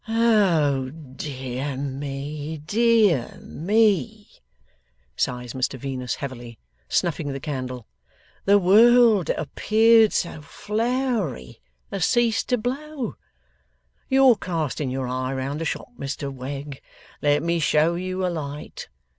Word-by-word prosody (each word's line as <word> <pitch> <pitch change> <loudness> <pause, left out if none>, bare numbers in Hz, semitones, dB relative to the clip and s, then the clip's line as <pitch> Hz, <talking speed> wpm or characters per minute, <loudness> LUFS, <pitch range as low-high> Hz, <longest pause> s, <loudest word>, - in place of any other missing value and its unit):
'Oh 185 - +2
dear 135 -2 -6
me, 145 +3 -5
dear 205 - +2
me!' 210 +3 0 0.8
sighs 125 -1 -2
Mr 130 0 -2
Venus, 125 -2 -4
heavily, 120 -4 -7 0.3
snuffing 155 -4 0
the 135 - -5
candle, 130 -5 -5 0.6
'the 200 +1 +6
world 220 +1 +5
that - - -1
appeared 220 +7 +4
so 165 -3 -2
flowery 215 - -2 0.3
has 195 -3 0
ceased 235 -3 +1
to 250 - +3
blow! 265 +3 -4 1.0
You're 265 -3 +5
casting 155 -7 -2
your 130 0 -3
eye 130 +1 -2
round 135 +4 -3
the - - -2
shop, - - -4
Mr 140 0 -4
Wegg. 135 +2 -7 0.4
Let 145 +1 +2
me 170 0 0
show 155 +2 +3
you 185 +1 -3
a - - +1
light. 150 -3 -6
155 Hz, 115 wpm, -24 LUFS, 135-215 Hz, 1.0 s, the